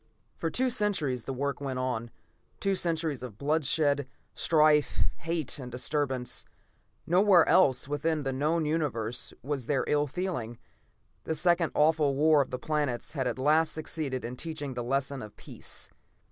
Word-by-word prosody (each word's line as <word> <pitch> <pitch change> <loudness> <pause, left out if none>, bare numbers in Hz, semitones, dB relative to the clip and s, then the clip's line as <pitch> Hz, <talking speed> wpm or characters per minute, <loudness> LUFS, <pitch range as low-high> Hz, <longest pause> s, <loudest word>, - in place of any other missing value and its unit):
For 165 - -2
two 255 +7 0
centuries 150 - 0
the - - -3
work 140 +2 -2
went 135 -2 -3
on. 125 -2 -2 0.5
Two 195 - +1
centuries 165 -6 -1
of 120 -5 -8
bloodshed, 145 -1 +1 0.3
strife, 150 -2 +3
hate 165 -3 -2
and 125 -2 -7
disturbance. 130 0 -1 0.6
No 180 +3 +4
where 195 -5 +6
else 135 -9 +4
within 150 +1 -1
the 135 -1 -1
known 155 +4 +1
Universe 130 -8 -2
was 135 -3 -3
there 140 -3 +1
ill 150 0 +2
feeling. 145 -8 -3 0.7
The 160 - -1
second 170 +1 +2
awful 150 -2 +3
War 150 +1 +5
of 135 - -2
the 125 - -3
Planets 145 -3 -2
had 135 -4 -1
at 120 - -2
last 155 +4 +3
succeeded 150 -5 -3
in 125 +2 -6
teaching 150 -4 -5
the 120 -1 -3
lesson 135 +2 -1
of 105 -2 -10
peace. - - -4
145 Hz, 160 wpm, -29 LUFS, 130-160 Hz, 0.7 s, where